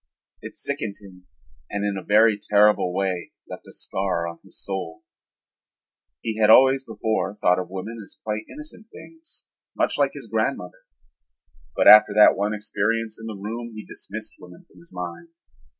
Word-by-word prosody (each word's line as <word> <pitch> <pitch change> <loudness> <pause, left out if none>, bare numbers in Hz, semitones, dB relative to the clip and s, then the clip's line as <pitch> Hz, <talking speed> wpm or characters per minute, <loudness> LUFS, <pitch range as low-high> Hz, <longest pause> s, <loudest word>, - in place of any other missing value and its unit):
It - - -10
sickened 100 -3 -3
him 90 -3 -16 0.4
and 100 0 -3
in 100 -1 -1
a 95 - -4
very 110 +1 +4
terrible 105 -2 +3
way 95 -1 -3
left - - -10
a - - -12
scar 90 -3 -2
on 85 0 -8
his - - -12
soul. 95 -4 -6 1.2
He 110 -1 -4
had 105 -1 +4
always 135 +3 +6
before 110 -3 -2
thought 90 -3 +2
of 90 - -5
women 100 +5 -6
as - - -14
quite 110 0 -3
innocent 300 -7 -11
things, 325 0 -13 0.3
much - - 0
like 140 -1 +2
his 140 -4 -7
grandmother, 100 -5 -3 0.9
but - - +2
after 105 -1 +9
that 105 - +7
one 105 +1 -1
experience 110 +2 -2
in 115 - -8
the 110 -2 -6
room 115 +3 -6
he 110 - -8
dismissed 105 +2 -7
women 90 0 -15
from 90 - -20
his 85 - -18
mind. 90 - -7
105 Hz, 165 wpm, -23 LUFS, 95-115 Hz, 1.2 s, after